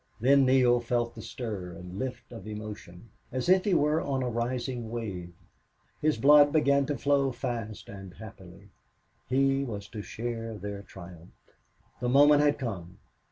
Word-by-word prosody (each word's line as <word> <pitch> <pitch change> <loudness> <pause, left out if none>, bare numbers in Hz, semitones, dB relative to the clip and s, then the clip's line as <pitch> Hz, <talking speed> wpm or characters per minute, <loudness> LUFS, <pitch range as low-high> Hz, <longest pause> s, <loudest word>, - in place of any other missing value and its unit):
Then 135 +2 +4
Neale 125 -2 +4
felt 120 0 -1
the 110 - -9
stir 105 -6 -6
and 90 +3 -9
lift 125 -2 -5
of 115 -4 -9
emotion, 105 -2 -9 0.2
as 130 0 -3
if 185 +1 +4
he 200 -4 +2
were 150 +2 +2
on 135 -2 -1
a 125 - -1
rising 120 0 -3
wave. 100 -7 -5 0.7
His 155 -4 +2
blood 145 +4 +6
began 140 -2 +3
to 145 -2 -2
flow 140 -1 +2
fast 120 -4 -5
and 95 -3 -10
happily. 100 -2 -13 0.6
He 135 +1 +2
was 105 -6 -6
to 105 - -6
share 115 +1 -5
their 100 0 -6
triumphs. 90 -3 -14 0.5
The 120 - -1
moment 145 +3 +6
had 145 0 +3
come. 95 -7 -6
120 Hz, 160 wpm, -28 LUFS, 100-135 Hz, 0.7 s, blood